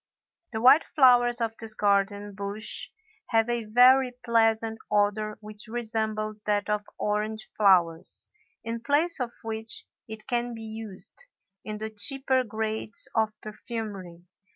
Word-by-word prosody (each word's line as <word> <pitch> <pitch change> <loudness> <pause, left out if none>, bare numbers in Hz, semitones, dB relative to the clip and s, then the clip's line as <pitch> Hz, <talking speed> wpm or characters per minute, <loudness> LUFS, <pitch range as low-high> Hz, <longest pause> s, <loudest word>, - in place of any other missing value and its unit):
The 220 -1 -3
white 265 +6 +7
flowers 245 -4 +4
of 225 -1 -1
this 220 -1 -3
garden 205 0 +1
bush 200 +2 -3 0.4
have 225 -1 +2
a 240 -2 -1
very 250 +3 +5
pleasant 225 -1 +2
odor 210 +1 +1
which 210 +1 -6
resembles 220 -2 -2
that 205 0 +1
of 210 0 0
orange 215 +1 -2
flowers, 175 -5 +3 0.4
in 230 0 -4
place 300 +6 +2
of 245 -2 -2
which 225 0 -4 0.2
it 220 -1 -9
can 240 -1 -2
be 225 - -8
used, 220 - -5 0.4
in 215 0 -5
the 220 +1 -5
cheaper 260 +4 +2
grades 220 0 -4
of 220 -1 0
perfumery. 210 -5 -7
220 Hz, 130 wpm, -27 LUFS, 210-235 Hz, 0.4 s, white